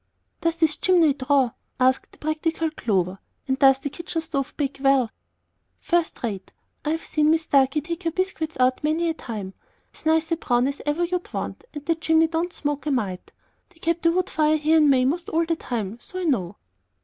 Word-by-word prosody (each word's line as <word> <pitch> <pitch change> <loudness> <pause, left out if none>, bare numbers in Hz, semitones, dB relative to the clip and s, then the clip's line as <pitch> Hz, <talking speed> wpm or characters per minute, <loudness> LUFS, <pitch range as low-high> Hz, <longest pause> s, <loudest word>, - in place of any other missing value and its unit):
"Does 335 0 +1
this 320 -2 +2
chimney 340 -6 +4
draw?" 270 -2 +2 0.3
asked 260 +1 +2
the - - -16
practical 315 +1 -1
Clover; 190 - -1 0.3
"and 265 0 0
does 270 -1 +6
the 280 +1 -5
kitchen 345 +1 -4
stove 300 -5 -3
bake 275 -2 -2
well?" 270 -4 +3 0.7
"First 345 -7 0
rate. 200 -5 -4 0.3
I've 320 +2 -1
seen 305 0 +1
Mis 320 0 +3
Starkey 275 0 +3
take 335 +4 -5
her 335 - 0
biscuits 330 -3 -2
out 255 +2 +2
many 320 +3 +1
a - - 0
time, 210 -10 -6 0.4
as - - -16
nice 320 +1 +2
a 330 - +2
brown 245 -4 +1
as 280 0 -4
ever 300 +4 +1
you'd 360 +1 -2
want; - - -5
and 295 -1 -7
the 330 - +3
chimney 320 0 +3
don't 330 +2 -1
smoke 290 -1 -3
a - - +1
mite. 200 -8 -2 0.4
They 360 - -26
kep' 335 0 -1
a 335 - +5
wood 365 +1 0
fire 310 0 +3
here 310 +2 +3
in 300 -2 +5
May 255 -2 +4
most 330 +6 -1
all 330 +1 +1
the 330 0 0
time, 230 -7 -4
so 370 - -10
I 370 - -2
know." 205 - 0
305 Hz, 205 wpm, -24 LUFS, 265-330 Hz, 0.7 s, does